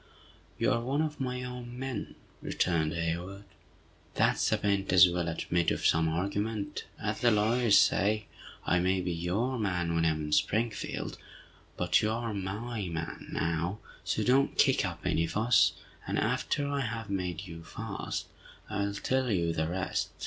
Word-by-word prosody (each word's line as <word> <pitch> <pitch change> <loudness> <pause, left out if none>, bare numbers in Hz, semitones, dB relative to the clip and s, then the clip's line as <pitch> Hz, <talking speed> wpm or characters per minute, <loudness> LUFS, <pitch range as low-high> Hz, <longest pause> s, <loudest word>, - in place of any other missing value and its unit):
"You - - +2
are 115 - +1
one 135 +6 0
of 155 -1 -4
my 125 -1 -2
own 125 -1 -7
men!" 130 -5 -4 0.3
returned 80 -4 0
Hayward. 85 +4 -3 0.7
"That's - - +2
a - - +3
p'int 100 -1 0
as 90 0 +9
will 85 -1 -1
admit 85 +1 0
of - - -2
some 80 0 +4
argument, 100 +5 -2
as - - -2
the 120 - +5
lawyers 110 +1 +4
say! 105 +2 +3 0.4
I 90 - +3
may 95 +1 +2
be 90 - -2
your 100 +10 -1
man 90 -5 0
when 85 0 +2
I - - +4
am 80 -1 -2
in 75 - -5
Springfield, 105 +9 0 0.6
but - - +3
you 105 - +1
are 115 0 -2
my 100 +2 -3
man 80 -1 -5
now! 85 +4 -1 0.3
So - - 0
don't 135 +2 +3
kick 135 -2 +4
up 85 -4 -4
any 85 -1 +1
fuss, 105 -9 +4 0.3
and - - -1
after 145 -1 0
I 140 0 -1
have 115 -5 -3
made 90 -2 -2
you 85 -2 -9
fast, - - -5 0.5
I'll 100 -1 -1
tell 130 +4 0
you 85 -5 +1
the 80 -1 0
rest. 95 +3 -2
100 Hz, 165 wpm, -30 LUFS, 85-115 Hz, 0.7 s, as